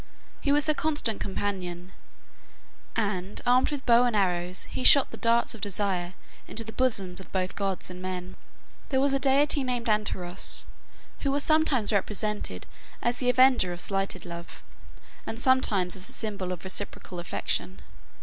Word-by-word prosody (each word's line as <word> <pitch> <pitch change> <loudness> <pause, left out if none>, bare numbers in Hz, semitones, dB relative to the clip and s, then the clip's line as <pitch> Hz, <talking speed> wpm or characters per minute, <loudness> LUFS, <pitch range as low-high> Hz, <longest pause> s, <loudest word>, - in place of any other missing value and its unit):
He 280 - 0
was 295 +1 +3
her 310 - +3
constant 295 -9 -1
companion; 185 -3 -4 1.0
and, 200 -3 -2
armed 250 +1 +4
with 290 -3 -5
bow 240 0 +6
and 240 -3 0
arrows, 180 -2 0
he 255 - -5
shot 280 +1 +7
the - - -6
darts 235 0 +2
of 225 - -11
desire 190 -3 -1 0.3
into 230 - 0
the 220 0 -9
bosoms 195 -8 -1
of - - -15
both 185 -1 -2
gods 195 -2 -1
and 180 0 -9
men. 185 0 -5 0.5
There 265 - +2
was 275 0 +3
a 275 - +2
deity 280 +1 +3
named 245 -2 -2
Anteros, 195 -4 0 0.5
who 280 - -1
was 285 +1 +1
sometimes 305 -9 +2
represented 205 - -2 0.4
as 240 +1 0
the 250 - +2
avenger 250 -8 +4
of 175 - -8
slighted 195 -1 -2
love, 170 0 -9 0.6
and 225 - -5
sometimes 215 -9 +3
as 185 -1 -6
the - - -3
symbol 200 -4 -3
of 180 - -6
reciprocal 185 -1 -3
affection. 95 - -2
205 Hz, 160 wpm, -27 LUFS, 185-255 Hz, 1.0 s, shot